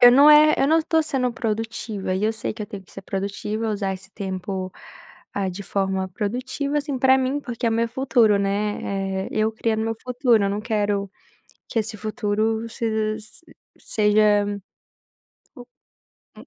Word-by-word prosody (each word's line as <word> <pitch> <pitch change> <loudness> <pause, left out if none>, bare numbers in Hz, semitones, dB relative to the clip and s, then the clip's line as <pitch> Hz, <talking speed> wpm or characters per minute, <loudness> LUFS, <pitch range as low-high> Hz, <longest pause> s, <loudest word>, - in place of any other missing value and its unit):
eu 245 - +10
não 285 +4 +8
é 305 0 +8
eu - - +3
não 320 +3 +4
tô 320 0 +2
sendo 265 -5 0
produtiva, 225 -4 -3
e 190 +3 0
eu 220 - +2
sei 220 - -4
que 215 - -6
eu - - -5
tenho 205 -3 -8
que 185 - -20
ser 195 - -9
produtiva, 205 +3 -3
usar 200 -2 -1
esse 195 +2 -12
tempo, 190 -1 -4 0.6
ah, 195 -1 0
de 185 +2 -6
forma 190 -1 -1
produtiva, 255 +9 -2
assim, 285 -2 -3
pra 265 +1 +5
mim, 265 +2 0
porque 240 -4 -4
é - - +3
o - - +1
meu 230 +1 +1
futuro, 235 -4 +3
né, 195 -1 -1
eh, - - -6
eu 220 0 +1
criando 220 0 -1
o - - -1
meu 225 - -1
futuro, 245 -4 +2
eu 200 - +1
não 205 +1 -2
quero 205 -3 -1 0.6
que 230 - 0
esse 220 0 -3
futuro 220 +1 -1
sej 220 -1 -1
s 215 +8 -12 0.4
seja, 210 -1 +3 1.9
u - - -13
215 Hz, 180 wpm, -23 LUFS, 200-245 Hz, 1.9 s, eu